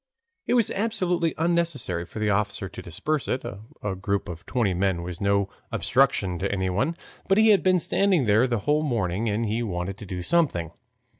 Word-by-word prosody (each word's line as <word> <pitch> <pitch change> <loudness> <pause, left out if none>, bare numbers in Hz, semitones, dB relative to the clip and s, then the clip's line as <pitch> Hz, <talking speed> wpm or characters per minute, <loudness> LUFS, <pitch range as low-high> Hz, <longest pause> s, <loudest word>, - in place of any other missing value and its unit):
It - - +2
was 235 -4 +4
absolutely 180 -6 0
unnecessary 165 - 0
for - - -11
the 110 -1 +1
officer 100 -1 -1
to 95 - -9
disperse 145 - -2
it. 130 - -1 0.4
A 105 -2 -1
group 100 +1 -2
of 85 -1 -8
twenty 115 -7 +1
men 90 -1 0
was 85 -1 -7
no 100 0 +2 0.2
obstruction 90 -2 +1
to 100 - -1
anyone, 100 - 0 0.3
but 195 - +3
he 220 0 +6
had 205 -2 +6
been 185 -1 +4
standing 180 -3 +2
there 110 +4 +4
the 120 -4 -1
whole 150 +1 +3
morning, 110 - -1
and 110 +3 0
he 110 +2 -1
wanted 95 -2 -3
to 105 - -9
do 90 -1 -4
something. 110 - +1
105 Hz, 190 wpm, -25 LUFS, -, 0.4 s, he